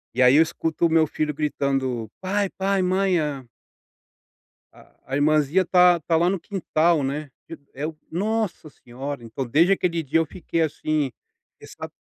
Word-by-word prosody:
E 130 Hz, -, +3 dB
aí 125 Hz, +2 st, +6 dB
eu -, -, +7 dB
escuto 165 Hz, 0 st, -2 dB
o -, -, -4 dB
meu 160 Hz, -1 st, +4 dB
filho 150 Hz, 0 st, -2 dB
gritando: 135 Hz, -6 st, -1 dB
"Pai, 195 Hz, +1 st, -1 dB
pai, 195 Hz, 0 st, +1 dB
mãe 185 Hz, -1 st, +2 dB
a" 140 Hz, -4 st, -3 dB, 1.3 s
a -, -, -20 dB
a 135 Hz, -, -4 dB
irmãzinha 150 Hz, +3 st, +3 dB
está 180 Hz, 0 st, +5 dB
está 165 Hz, +1 st, -1 dB
lá 175 Hz, +2 st, +3 dB
no 195 Hz, -, -1 dB
quintal, 170 Hz, -5 st, 0 dB
né. 145 Hz, +2 st, -3 dB, 0.2 s
E 165 Hz, -, -7 dB, 0.2 s
eu: 150 Hz, +3 st, -5 dB
"Nossa 205 Hz, -3 st, -2 dB
senhora". 135 Hz, +1 st, -8 dB
Então, 115 Hz, +4 st, -5 dB
desde 165 Hz, +10 st, +4 dB
aquele 170 Hz, -4 st, -1 dB
dia 150 Hz, +4 st, +1 dB
eu 165 Hz, -, +1 dB
fiquei 165 Hz, +1 st, -3 dB
assim, 155 Hz, -2 st, -1 dB, 0.5 s
ressa -, -, -9 dB
155 Hz, 165 wpm, -23 LUFS, 140-180 Hz, 1.3 s, eu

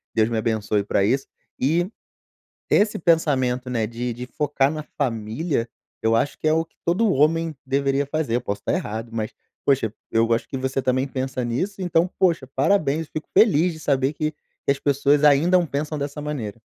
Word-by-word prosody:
Deus 110 Hz, 0 st, +3 dB
me 115 Hz, -, -1 dB
abençoe 110 Hz, -2 st, 0 dB
pra 100 Hz, -, +1 dB
isso. 130 Hz, +7 st, +1 dB, 0.3 s
E 170 Hz, +7 st, +1 dB, 0.8 s
esse 210 Hz, +1 st, +3 dB
pensamento, 130 Hz, -7 st, +1 dB
né, 115 Hz, -3 st, 0 dB
de 120 Hz, +2 st, -4 dB
de 125 Hz, +2 st, -6 dB
focar 140 Hz, +1 st, 0 dB
na 155 Hz, -1 st, -5 dB
família, 115 Hz, +2 st, -1 dB, 0.3 s
eu 115 Hz, 0 st, +3 dB
acho 140 Hz, +5 st, 0 dB
que 155 Hz, -, -1 dB
é 155 Hz, -, +4 dB
o 160 Hz, +1 st, +2 dB
que 165 Hz, -, -40 dB
todo 195 Hz, +5 st, +2 dB
homem 160 Hz, +3 st, +2 dB
deveria 140 Hz, +1 st, +1 dB
fazer, 145 Hz, -4 st, -1 dB
eu 125 Hz, -, +1 dB
posso 100 Hz, -3 st, -4 dB
tá -, -, 0 dB
errado, 110 Hz, +2 st, -3 dB
mas 110 Hz, -1 st, -3 dB, 0.3 s
poxa, 130 Hz, -6 st, +2 dB, 0.2 s
eu 115 Hz, +1 st, +2 dB
acho 115 Hz, -, -1 dB
que 135 Hz, -, -4 dB
você 130 Hz, +1 st, -1 dB
também 130 Hz, +1 st, +1 dB
pensa 130 Hz, -1 st, -3 dB
nisso, 185 Hz, +13 st, -2 dB
então, 175 Hz, 0 st, +2 dB
poxa, 170 Hz, -7 st, +2 dB
parabéns! 155 Hz, 0 st, +2 dB
Fico 155 Hz, -, -6 dB
feliz 180 Hz, -5 st, +5 dB
de 160 Hz, -, -10 dB
saber 135 Hz, -1 st, +1 dB
que 155 Hz, 0 st, -1 dB, 0.3 s
que -, -, +3 dB
as 140 Hz, -, -1 dB
pessoas 145 Hz, +1 st, +3 dB
ainda 165 Hz, +6 st, +5 dB
pensam 150 Hz, +2 st, -3 dB
dessa 145 Hz, +1 st, -4 dB
maneira. 125 Hz, -8 st, -4 dB
140 Hz, 185 wpm, -23 LUFS, 120-155 Hz, 0.8 s, feliz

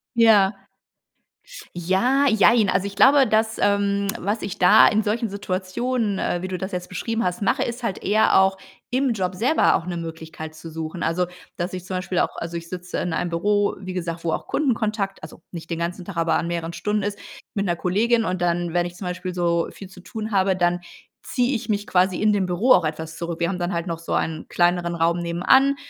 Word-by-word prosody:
Ja. 210 Hz, -4 st, +5 dB, 1.2 s
Ja, 190 Hz, +11 st, +2 dB
jein. 220 Hz, -1 st, +5 dB
Also, 190 Hz, -, +1 dB
ich 200 Hz, 0 st, -6 dB
glaube, 270 Hz, +5 st, +6 dB
das, 220 Hz, +1 st, +1 dB
ähm, 200 Hz, 0 st, +2 dB
was 205 Hz, +4 st, -2 dB
ich 195 Hz, -, -5 dB
da 195 Hz, +4 st, +7 dB
in 215 Hz, +1 st, +1 dB
solchen 225 Hz, +2 st, -1 dB
Situationen, 200 Hz, +3 st, -2 dB
äh, 175 Hz, -, -1 dB
wie 185 Hz, -, -4 dB
du 185 Hz, -, -3 dB
das 190 Hz, +2 st, -5 dB
jetzt 180 Hz, 0 st, -4 dB
beschrieben 225 Hz, +4 st, -2 dB
hast, 180 Hz, +2 st, -2 dB
mache, 200 Hz, -, +1 dB
ist 240 Hz, +1 st, -4 dB
halt 230 Hz, -6 st, -3 dB
eher 215 Hz, +2 st, +4 dB
auch 190 Hz, 0 st, +2 dB, 0.3 s
im 260 Hz, 0 st, +1 dB
Job 185 Hz, -3 st, -2 dB
selber 255 Hz, -, +3 dB
auch 165 Hz, -, -2 dB
'ne 180 Hz, -1 st, -4 dB
Möglichkeit 160 Hz, -1 st, -7 dB
zu 160 Hz, +1 st, -10 dB
suchen. 160 Hz, +2 st, -6 dB
Also, 180 Hz, +1 st, 0 dB, 0.3 s
dass 175 Hz, +2 st, -3 dB
ich 185 Hz, -1 st, -6 dB
zum 185 Hz, -, -4 dB
Beispiel 185 Hz, 0 st, -1 dB
auch -, -, 0 dB
also, 170 Hz, 0 st, -5 dB
ich 170 Hz, 0 st, -8 dB
sitze 180 Hz, 0 st, -6 dB
in 175 Hz, -, -2 dB
einem 175 Hz, +2 st, -1 dB
Büro, 205 Hz, +4 st, +1 dB
wie 185 Hz, -1 st, -6 dB
gesagt, 170 Hz, -2 st, -4 dB
wo 165 Hz, -, +1 dB
auch -, -, -4 dB
Kundenkontakt 215 Hz, -, -1 dB
also, 155 Hz, +1 st, -11 dB
nicht 165 Hz, -2 st, -8 dB
den 170 Hz, -1 st, -3 dB
ganzen 175 Hz, +2 st, -3 dB
Tag, 180 Hz, -1 st, -8 dB
aber 165 Hz, 0 st, +2 dB
an 170 Hz, -, 0 dB
mehreren 170 Hz, -1 st, -3 dB
Stunden 210 Hz, +3 st, -1 dB
ist, 205 Hz, 0 st, -3 dB, 0.4 s
mit 200 Hz, -1 st, -1 dB
'ner 175 Hz, -3 st, 0 dB
Kollegin, 225 Hz, +7 st, +1 dB
und 185 Hz, -2 st, -2 dB
dann, 175 Hz, -1 st, 0 dB
wenn 175 Hz, 0 st, +2 dB
ich 175 Hz, 0 st, -7 dB
zum 180 Hz, +1 st, -6 dB
Beispiel 180 Hz, +1 st, -4 dB
so 170 Hz, -1 st, 0 dB
viel 195 Hz, -, -10 dB
zu 185 Hz, 0 st, -14 dB
tun 220 Hz, +3 st, -6 dB
habe, 190 Hz, -1 st, +2 dB
dann 175 Hz, 0 st, +1 dB, 0.4 s
ziehe 250 Hz, +1 st, 0 dB
ich 225 Hz, -, -5 dB
mich 205 Hz, -1 st, 0 dB
quasi 185 Hz, -1 st, +2 dB
in 210 Hz, 0 st, +3 dB
dem 195 Hz, -2 st, +1 dB
Büro 185 Hz, +9 st, +1 dB
auch 180 Hz, -, +7 dB
etwas 160 Hz, +1 st, -4 dB
zurück. 170 Hz, 0 st, -5 dB
Wir 170 Hz, -, +1 dB
haben 180 Hz, +1 st, -3 dB
dann 175 Hz, +1 st, -2 dB
halt 170 Hz, 0 st, -2 dB
noch 165 Hz, -2 st, -4 dB
so 165 Hz, -, -5 dB
einen 160 Hz, -1 st, -2 dB
kleineren 175 Hz, 0 st, +1 dB
Raum 170 Hz, +1 st, +1 dB
nebenan 180 Hz, +12 st, +3 dB
185 Hz, 220 wpm, -23 LUFS, 170-210 Hz, 1.2 s, da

